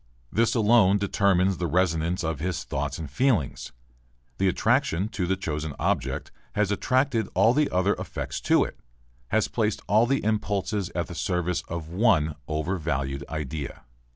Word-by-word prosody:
This 115 +2 +2
alone 110 -3 +5
determines 95 -2 +2
the 90 - 0
resonance 85 0 +1
of 80 -2 -2
his 90 +3 -2
thoughts 70 +1 -3
and 80 - -5
feelings. 105 - 0 0.7
The 95 - +3
attraction 95 +1 +1
to 100 -5 -2
the 95 - +1
chosen 75 -5 -4
object - - -1 0.2
has 105 -1 +1
attracted 130 +2 +1
all 110 +6 +5
the 150 +1 +2
other 95 +3 +2
affects - - -5
to - - +6
it, - - -7 0.5
has 110 +8 +1
placed 110 -3 -1
all 110 +3 +4
the 135 +2 +1
impulses 100 -2 -1
at 85 - 0
the - - -9
service 90 0 -1
of 80 -1 -5
one 90 -5 +3
overvalued 75 -4 -2
idea. 75 -2 -5
95 Hz, 155 wpm, -26 LUFS, 80-105 Hz, 0.7 s, to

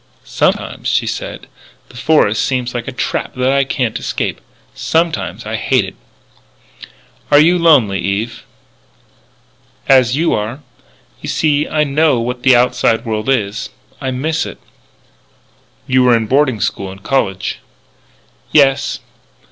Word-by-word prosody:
"Sometimes," - - -1
she - - +1
said, - - -5 0.4
"the - - -17
forest 125 -5 +2
seems 125 -2 -1
like 120 -1 -4
a - - -3
trap 130 - -3
that 130 +1 +1
I 140 0 +3
can't 125 -4 -2
escape. - - -3 0.3
Sometimes 155 - -1
I 110 +1 -3
hate 130 -2 +1
it." 95 - -9 1.4
"Are 145 - +6
you 170 +4 +4
lonely, 130 -13 +4
Eve?" 105 +5 -2 1.5
"As 130 -2 +4
you 165 +2 +1
are. 110 +7 -3 0.6
You - - -6
see 150 -2 +1
I 155 -1 +1
know 150 -2 +2
what 125 +1 -3
the 130 -1 +5
outside 120 -1 +2
world 110 +1 -2
is. 110 -5 -1 0.3
I 135 - -2
miss 155 +5 -1
it." - - -9 1.3
"You 130 0 +2
were 125 -2 +5
in 110 - -2
boarding 130 -2 +1
school 100 -1 -2
and 95 0 -13
college." 95 -9 -1 0.9
"Yes." 140 -1 +3
125 Hz, 135 wpm, -16 LUFS, 110-145 Hz, 1.5 s, Are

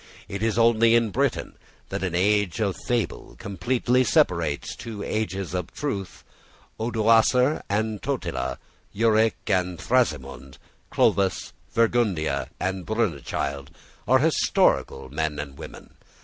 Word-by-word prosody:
It 100 +1 -5
is 115 -1 0
only 115 0 +5
in 115 -2 +2
Britain - - -1 0.3
that - - -3
an 90 -3 -2
age 100 0 +2
of 100 -4 0
fable 120 -3 -2
completely 125 +5 0
separates 85 - +1
two 110 -4 -7
ages 100 -5 -3
of 90 -3 -3
truth. 100 -11 -4 0.6
Odoacer 115 +4 +3
and 105 +1 -1
Totila, 85 - -3 0.4
Euric 110 0 +3
and 90 -1 0
Thrasimund, 120 - -1 0.3
Clovis, 95 -2 +1 0.2
Fredegunda, 115 -8 +1
and 95 -1 -2
Brunechild, 70 - -2 0.4
are - - +6
historical 65 0 +2
men 75 0 -2
and 70 -2 -6
women. - - -10
105 Hz, 115 wpm, -25 LUFS, 85-115 Hz, 0.6 s, are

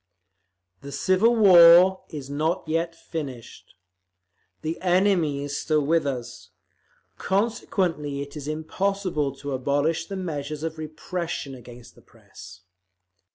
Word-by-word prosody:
"The 140 - -9
civil 195 +10 +2
war 185 -2 +7
is 145 -4 -7
not 155 +5 -2
yet 165 +1 -1
finished; 140 -9 -8 0.9
the 160 +2 -4
enemy 180 -6 +2
is 145 0 -4
still 150 0 0
with 160 0 +2
us; 125 -4 -6 0.7
consequently 180 -8 -1
it 140 +1 -12
is 145 -1 -7
impossible 160 -1 -2
to 145 +1 -7
abolish 145 +5 0
the 195 - -5
measures 150 -4 -5
of 160 -1 -4
repression 155 -1 -5
against 120 -1 -13
the - - -20
Press. 90 0 -15
155 Hz, 115 wpm, -24 LUFS, 140-180 Hz, 0.9 s, war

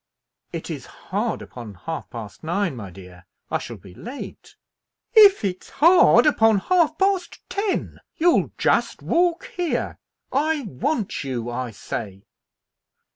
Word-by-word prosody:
"It - - -5
is - - -6
hard - - -3
upon 115 -5 -10
half 160 - -6
past 110 -4 -9
nine, 175 -1 -1
my 105 -5 -7
dear. 90 0 -13 0.3
I - - +1
shall - - -7
be 95 - -14
late." 245 - -9 0.6
"If 405 - +7
it's 185 -1 -4
hard 340 +5 +6
upon 225 -8 +4
half 320 - +2
past 385 -2 0
ten, 400 -1 -2 0.2
you'll 340 +1 +3
just - - +1
walk 345 0 +1
here. 350 -3 -2 0.3
I 300 +2 +1
want 215 - -2
you, 120 -3 -3
I 125 0 -3
say." 100 -2 -6
210 Hz, 130 wpm, -23 LUFS, -, 0.6 s, If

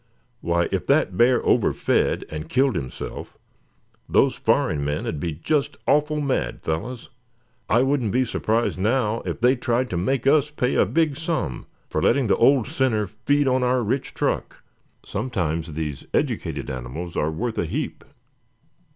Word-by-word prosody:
"Why, 85 -1 +1
if 95 -2 -2
that 145 +3 +2
bear 120 +2 +4
overfed, - - +2
and 75 +1 -6
killed 130 -2 +2
himself, 65 -6 -6 0.7
those - - +4
foreign 75 -3 +1
men'd 75 +1 -2
be 80 +2 -2
just 140 - -1
awful 150 +1 +2
mad, 130 - -2
fellows. 115 +11 -4 0.6
I 120 +3 +4
wouldn't 135 -6 +1
be 130 +3 +2
surprised 115 -3 0
now, 110 +1 +1
if - - -3
they 125 +3 +4
tried 125 0 -1
to 90 - -1
make 130 +11 0
us 150 +1 +4
pay 135 -4 -1
a - - +3
big 155 -4 +1
sum 160 - -3 0.2
for - - -2
letting 140 -2 +3
the 105 - +2
old 130 0 +4
sinner 130 -7 0
feed 135 +8 0
on 130 0 +2
our 125 0 +2
rich 130 +5 -2
truck. - - -2 0.4
Sometimes 85 -8 -2
these 75 -2 -4
educated - - -1
animals 65 +7 -6
are 75 - +1
worth 110 +9 -3
a - - +1
heap." - - -4
120 Hz, 155 wpm, -23 LUFS, 85-135 Hz, 0.7 s, bear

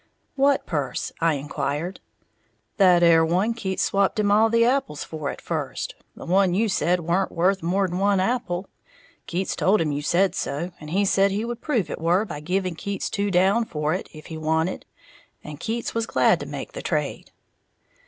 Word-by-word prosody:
"What 280 0 +2
purse?" 140 -6 -3
I 165 -2 +3
inquired. 145 +4 -3 0.8
"That 180 -3 +5
'ere 165 -1 +6
one 185 +8 +1
Keats 190 -5 -2
swapped 200 +3 +1
him 205 -1 +2
all 220 +2 +5
the 230 +1 +4
apples 255 - 0
for 155 -3 -5
at - - -6
first, - - -4 0.2
the - - -10
one 185 0 +3
you 220 +3 +2
said 180 -2 +1
weren't 175 +4 0
worth 190 +3 +1
more'n 180 +1 0
one 200 0 +3
apple. 190 -3 -1 0.6
Keats 185 +2 -2
told 205 +3 +3
him 155 -2 0
you 145 0 -2
said 180 +5 +2
so, 155 +6 -3
and 150 - -9
he 195 +5 +1
said 195 0 +3
he 205 +3 -2
would 240 0 -5
prove 245 - 0
it - - -5
were 175 +6 +2
by 150 -8 -6
giving 180 +3 -1
Keats 200 +5 -4
two 200 0 -1
down 195 +5 +3
for 150 -6 -2
it, 185 - -4
if 155 -1 -12
he 160 -1 -7
wanted; 160 +3 -1 0.6
and 150 -1 -9
Keats 230 +5 -3
was 230 0 -1
glad - - +3
to - - -6
make - - -6
the - - -6
trade." - - -2
185 Hz, 190 wpm, -24 LUFS, 160-205 Hz, 0.8 s, ere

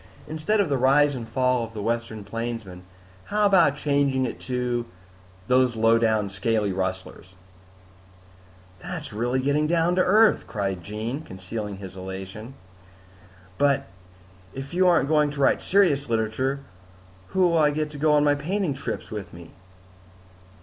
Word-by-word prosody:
Instead 160 +8 -1
of 200 - +3
The 140 -3 0
Rise 145 +3 +4
and 120 -4 -6
Fall 125 -2 +1
of 115 0 -8
the 105 - -4
Western 115 -2 -2
Plainsman, 115 -3 -5 0.4
how 210 0 +1
about 175 -8 +4
changing 140 -3 +1
it 120 - -5
to 125 -2 -2 0.6
Those 125 -1 +3
Lowdown 115 -1 +3
Scaly 100 +1 -1
Rustlers?" 95 0 -5 1.4
"That's - - -7
really 120 +4 0
getting 145 +3 +1
down 170 +1 +2
to - - +5
earth," 215 +4 +4
cried 100 -5 -3
Jean, 110 - -4
concealing 100 - -6
his 95 -1 -9
elation. 95 +6 -8 1.0
"But 140 -1 +2 0.7
if 135 +4 -7
you 185 +1 +3
aren't 170 -5 +4
going 150 -1 +3
to 145 0 -7
write 140 - +3
serious 150 -9 +2
literature, 115 +5 -1 0.7
who 185 - +2
will 170 -1 +2
I 150 -1 +5
get 150 0 -2
to 145 - -9
go 150 0 +3
on 145 0 +4
my 145 -1 +4
painting 170 +3 -1
trips 135 - -6
with 105 -4 -6
me?" 85 -1 -12
130 Hz, 150 wpm, -25 LUFS, 110-150 Hz, 1.4 s, to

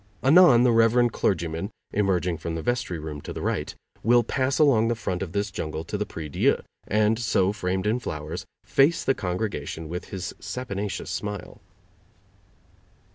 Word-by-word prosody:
Anon 145 -4 +7
the 125 - +5
rev. 115 +1 +4
clergyman, 85 0 -1 0.2
emerging 90 -4 +1
from 85 0 -4
the 80 - -4
vestry 120 -8 -1
room 75 -2 -6
to - - -7
the - - -5
right, - - -2 0.3
will 120 +2 +4
pass 130 +3 0
along 130 -7 +4
the 120 - +1
front 90 -5 -3
of 95 -4 -4
this 100 +1 -1
jungle 80 -3 -4
to 85 - -5
the 105 0 -2
prie 80 -2 -6
dieu, 70 - +2 0.3
and 110 +2 +2
so, 100 -4 +2
framed 95 -2 -2
in 110 +4 +1
flowers, 80 -5 -5 0.2
face 145 +5 +3
the 135 - +3
congregation 90 -5 -3
with 90 +3 -5
his 95 -2 -5
saponaceous 100 -2 -4
smile. 105 -3 -5
100 Hz, 165 wpm, -25 LUFS, 90-120 Hz, 0.3 s, Anon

